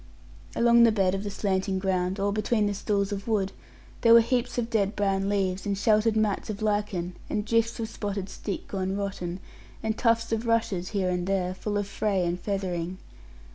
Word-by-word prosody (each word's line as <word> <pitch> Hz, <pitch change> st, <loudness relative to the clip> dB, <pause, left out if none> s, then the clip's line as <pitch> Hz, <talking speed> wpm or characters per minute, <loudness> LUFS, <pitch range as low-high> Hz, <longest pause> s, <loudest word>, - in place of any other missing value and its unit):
Along 235 Hz, 0 st, +5 dB
the 230 Hz, -1 st, +7 dB
bed 195 Hz, -3 st, +2 dB
of 195 Hz, +1 st, -2 dB
the 205 Hz, -, -3 dB
slanting 195 Hz, -1 st, -1 dB
ground, 185 Hz, 0 st, 0 dB
all 200 Hz, +1 st, +1 dB
between 215 Hz, +1 st, +1 dB
the 205 Hz, -, 0 dB
stools 200 Hz, 0 st, -1 dB
of 200 Hz, +1 st, -4 dB
wood, 205 Hz, -4 st, +1 dB, 0.5 s
there 230 Hz, -1 st, +7 dB
were 235 Hz, -, +9 dB
heaps 245 Hz, +1 st, -1 dB
of 235 Hz, -2 st, 0 dB
dead 205 Hz, -2 st, +1 dB
brown 195 Hz, -1 st, +1 dB
leaves, 195 Hz, -2 st, 0 dB
and 200 Hz, -1 st, -1 dB
sheltered 215 Hz, +1 st, +3 dB
mats 215 Hz, -1 st, 0 dB
of 215 Hz, 0 st, -4 dB
lichen, 205 Hz, -4 st, -1 dB
and 210 Hz, -1 st, -1 dB
drifts 230 Hz, +1 st, +1 dB
of 225 Hz, -, -2 dB
spotted 200 Hz, -3 st, -4 dB
stick 195 Hz, 0 st, -5 dB
gone 190 Hz, 0 st, -2 dB
rotten, 190 Hz, -3 st, -4 dB, 0.4 s
and 220 Hz, -1 st, 0 dB
tufts 230 Hz, -1 st, +2 dB
of 225 Hz, +1 st, -1 dB
rushes 215 Hz, -6 st, 0 dB
here 195 Hz, -3 st, 0 dB
and 180 Hz, 0 st, -2 dB
there, 185 Hz, -2 st, 0 dB
full 205 Hz, +2 st, -3 dB
of 205 Hz, -, 0 dB
fray 200 Hz, -2 st, 0 dB
and 175 Hz, +1 st, -1 dB
feathering. 185 Hz, -2 st, -3 dB
200 Hz, 195 wpm, -27 LUFS, 190-220 Hz, 0.5 s, were